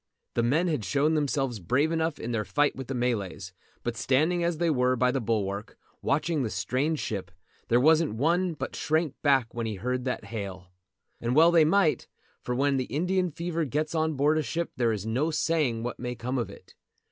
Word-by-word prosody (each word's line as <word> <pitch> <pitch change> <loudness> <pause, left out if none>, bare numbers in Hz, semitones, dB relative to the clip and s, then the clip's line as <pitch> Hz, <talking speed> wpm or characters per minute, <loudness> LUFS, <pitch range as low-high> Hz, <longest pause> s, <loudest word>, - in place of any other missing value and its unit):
The 120 - +1
men 150 +10 +2
had 150 -10 -1
shown 140 - +1
themselves 135 -6 0
brave 130 - +1
enough 160 -2 0
in 120 - -5
their 110 -2 0
fight 145 +9 +1
with 135 -2 -7
the 135 - -3
Malays, 105 -6 -2 0.3
but 120 -1 -2
standing 155 +8 +2
as 170 -1 0
they 170 0 +2
were 125 -2 +2
by 125 0 +2
the 135 0 -1
bulwark, 105 -2 -2 0.2
watching 155 +1 0
the 120 - -1
strange 130 - -1
ship, 95 -4 -4 0.4
there 120 - +4
wasn't 155 -3 +4
one 170 +7 +1
but - - -5
shrank 155 -2 0
back 135 -5 +2
when 115 -1 -3
he 110 - -3
heard 125 +6 -2
that 125 - -2
hail. 95 -4 -6 0.5
And 120 +2 -1
well 165 +3 +7
they 165 -2 +6
might, 180 -1 +2 0.3
for 125 - -3
when 140 +1 +2
the 130 - -1
Indian 180 +6 0
fever 170 +1 -2
gets 150 +3 -2
on 160 -1 0
board 150 +3 +3
a - - +2
ship 165 +3 -3
there 120 -3 +2
is 105 -2 -3
no 125 +8 0
saying 150 -7 0
what 120 - -4
may 125 0 -4
come 125 +3 -2
of 120 - -2
it. - - -14
135 Hz, 205 wpm, -27 LUFS, 115-160 Hz, 0.5 s, well